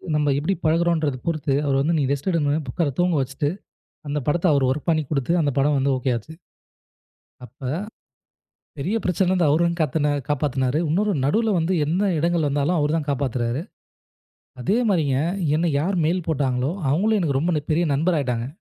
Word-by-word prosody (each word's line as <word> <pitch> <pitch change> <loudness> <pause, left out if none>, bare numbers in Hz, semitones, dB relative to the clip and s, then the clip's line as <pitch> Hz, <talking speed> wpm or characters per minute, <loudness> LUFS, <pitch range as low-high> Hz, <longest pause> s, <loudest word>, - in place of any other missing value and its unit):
நம்ம 150 -1 +2
எப்படி 160 +7 0
பழகுறோம்ன்றது 160 -3 +1
பொறுத்து, 155 -4 0
அவர் 135 -1 +2
வந்து 165 +3 +1
நீ - - +1
ரெஸ்ட் 140 +5 -1
எடுங்க. 150 -3 +1
புக்கர 150 +4 -1
தூங்க 175 -1 +2
வச்சிட்டு 135 +2 -2 0.6
அந்தப் 145 -2 -3
படத்தை 175 +4 +2
அவர் 140 -2 +2
வொர்க் 145 +5 -3
பண்ணி 155 -1 +2
கொடுத்து 140 +2 0
அந்தப் 145 -4 0
படம் 145 +1 +2
வந்து 135 +1 +1
ஓகே 130 0 -1
ஆச்சு. 120 +8 -8 1.1
அப்ப 130 0 -8 1.1
பெரிய 185 +11 -1
பிரச்சனைல 180 0 +1
இருந்து 180 -4 +2
அவரு 155 +4 +3
வந்து 170 0 -2
கத்த 150 0 0 0.2
காப்பாத்துனாரு. 140 -2 0
இன்னொரு 200 +6 +1
நடுவுல 220 +9 +2
வந்து 165 +3 0
எந்த 170 +6 0 0.2
இடங்கள் 170 -1 +1
வந்தாலும் 145 +5 0
அவரு 150 0 +1
தான் 150 -2 -3
காப்பாத்துறாரு. 130 -1 -1 1.0
அதே 200 - +1
மாதிரிங்க 150 -9 +1 0.4
என்ன 165 +1 +1
யார் 185 +6 0
மெயில் 175 +1 0
போட்டாங்களோ 135 -2 0 0.2
அவங்களே 210 +10 +2
எனக்கு 140 -6 0
ரொம்ப 160 -1 0
பெரிய 170 +3 +2
நண்பர் 165 +4 +1
ஆயிட்டாங்க. 125 -3 -2
150 Hz, 170 wpm, -23 LUFS, 140-170 Hz, 1.1 s, அவரு